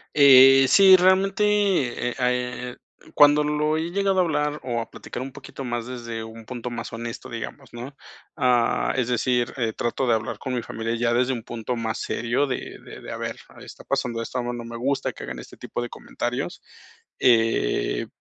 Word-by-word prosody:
Eh, 135 Hz, -1 st, +8 dB
sí, 195 Hz, +3 st, +8 dB
realmente, 190 Hz, +2 st, +3 dB
eh, 190 Hz, -13 st, +1 dB
ah, 125 Hz, -1 st, +2 dB
eh, 125 Hz, 0 st, -4 dB, 0.4 s
cuando 145 Hz, +1 st, +6 dB
lo 150 Hz, +1 st, 0 dB
he 165 Hz, +2 st, -3 dB
llegado 195 Hz, 0 st, +1 dB
a 185 Hz, -, +5 dB
hablar 150 Hz, -2 st, -1 dB
o 120 Hz, -2 st, -2 dB
a 115 Hz, -, -8 dB
platicar 120 Hz, -, -8 dB
un 135 Hz, +1 st, -6 dB
poquito 140 Hz, 0 st, -9 dB
más 120 Hz, -2 st, -3 dB
desde 115 Hz, -3 st, -6 dB
un 110 Hz, 0 st, -11 dB
punto 125 Hz, 0 st, -6 dB
más 115 Hz, -1 st, -6 dB
honesto, 115 Hz, 0 st, -7 dB
digamos, 115 Hz, 0 st, -8 dB
¿no?, 125 Hz, +4 st, -8 dB, 0.4 s
ah, 125 Hz, -4 st, +2 dB
es 125 Hz, -3 st, +1 dB
decir, 125 Hz, 0 st, 0 dB
eh, 115 Hz, -3 st, 0 dB
trato 120 Hz, +3 st, -2 dB
de 120 Hz, -, +4 dB
hablar 110 Hz, -1 st, -4 dB
con 130 Hz, -2 st, -3 dB
mi 120 Hz, -, -2 dB
familia 115 Hz, +1 st, -3 dB
ya 120 Hz, 0 st, +1 dB
desde 125 Hz, +2 st, +2 dB
un 115 Hz, -3 st, -5 dB
punto 120 Hz, +1 st, -4 dB
más 115 Hz, -1 st, -3 dB
serio 120 Hz, +5 st, -1 dB
de 130 Hz, -, -5 dB
de -, -, -11 dB
de: -, -, -8 dB
"A -, -, -5 dB
ver, -, -, -4 dB, 0.2 s
está -, -, -12 dB
pasando 125 Hz, -4 st, -2 dB
esto, 125 Hz, -, -4 dB
a -, -, 0 dB
mi 120 Hz, 0 st, -4 dB
no 120 Hz, -, -6 dB
me 115 Hz, 0 st, -7 dB
gusta 135 Hz, +3 st, -1 dB
que -, -, -10 dB
hagan 65 Hz, -1 st, -6 dB
este -, -, -11 dB
tipo -, -, -6 dB
de 120 Hz, -, -3 dB
comentarios", 125 Hz, +8 st, -5 dB, 0.6 s
eh, 115 Hz, -, +2 dB
125 Hz, 200 wpm, -24 LUFS, 115-145 Hz, 0.6 s, Eh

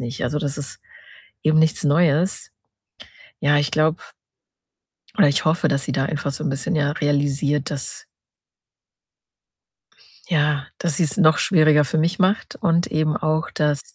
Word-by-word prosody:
nicht. 120 Hz, +1 st, -5 dB
Also, 150 Hz, -, -1 dB
das 145 Hz, 0 st, -3 dB
ist 140 Hz, -, -6 dB, 0.6 s
eben 155 Hz, 0 st, +3 dB
nichts 160 Hz, 0 st, +2 dB
Neues. 160 Hz, +4 st, +1 dB, 0.9 s
Ja, 145 Hz, 0 st, +2 dB
ich 145 Hz, -1 st, 0 dB
glaube 155 Hz, +1 st, +1 dB, 1.2 s
oder -, -, +5 dB
ich 140 Hz, -, +1 dB
hoffe, 160 Hz, +3 st, +2 dB
dass 140 Hz, -1 st, 0 dB
sie 140 Hz, -, -3 dB
da 135 Hz, +1 st, 0 dB
einfach 140 Hz, -1 st, -3 dB
so -, -, -6 dB
'n 160 Hz, -, -1 dB
bisschen, 140 Hz, +6 st, -2 dB
ja, 145 Hz, -2 st, +1 dB
realisiert, 145 Hz, 0 st, -1 dB
dass 140 Hz, -2 st, -5 dB, 2.2 s
ja, 150 Hz, -4 st, 0 dB
dass 170 Hz, -5 st, -1 dB
sie's 155 Hz, -4 st, +1 dB
noch 160 Hz, -5 st, +4 dB
schwieriger 155 Hz, -4 st, +4 dB
für 150 Hz, +3 st, -2 dB
mich 170 Hz, +3 st, 0 dB
macht 190 Hz, +3 st, 0 dB
und 170 Hz, -4 st, +1 dB
eben 155 Hz, 0 st, 0 dB
auch, 155 Hz, +1 st, -1 dB
dass 150 Hz, -2 st, 0 dB
150 Hz, 150 wpm, -21 LUFS, 145-160 Hz, 2.2 s, oder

